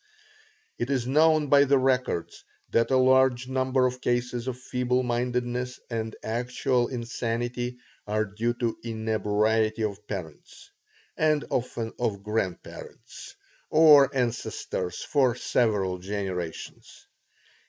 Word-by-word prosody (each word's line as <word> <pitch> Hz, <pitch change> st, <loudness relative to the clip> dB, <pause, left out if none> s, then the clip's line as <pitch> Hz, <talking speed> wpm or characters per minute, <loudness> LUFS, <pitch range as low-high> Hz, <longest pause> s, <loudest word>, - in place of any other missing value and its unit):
It 120 Hz, -, -2 dB
is 130 Hz, -4 st, 0 dB
known 155 Hz, +3 st, +4 dB
by 140 Hz, 0 st, +5 dB
the 140 Hz, 0 st, +4 dB
records 130 Hz, -9 st, -1 dB, 0.3 s
that 115 Hz, 0 st, +2 dB
a 130 Hz, -, +3 dB
large 130 Hz, -1 st, +4 dB
number 130 Hz, 0 st, +1 dB
of 125 Hz, 0 st, -2 dB
cases 120 Hz, 0 st, -1 dB
of 125 Hz, -2 st, -3 dB
feeble 125 Hz, 0 st, -1 dB
mindedness 125 Hz, +1 st, -2 dB
and 110 Hz, -1 st, -3 dB
actual 120 Hz, +2 st, 0 dB
insanity 120 Hz, 0 st, -3 dB, 0.3 s
are 110 Hz, +1 st, 0 dB
due 115 Hz, +4 st, -2 dB
to 120 Hz, -2 st, -2 dB
inebriety 110 Hz, 0 st, 0 dB
of 105 Hz, 0 st, -4 dB
parents, 85 Hz, -7 st, -8 dB, 0.4 s
and 155 Hz, -1 st, +1 dB
often 115 Hz, -2 st, -2 dB
of 100 Hz, -5 st, -2 dB
grandparents, 105 Hz, -4 st, -5 dB, 0.3 s
or 150 Hz, -4 st, +7 dB
ancestors 115 Hz, -7 st, -2 dB
for 130 Hz, -5 st, +2 dB
several 105 Hz, -7 st, 0 dB
generations. 95 Hz, -3 st, -6 dB
120 Hz, 110 wpm, -26 LUFS, 110-130 Hz, 0.4 s, or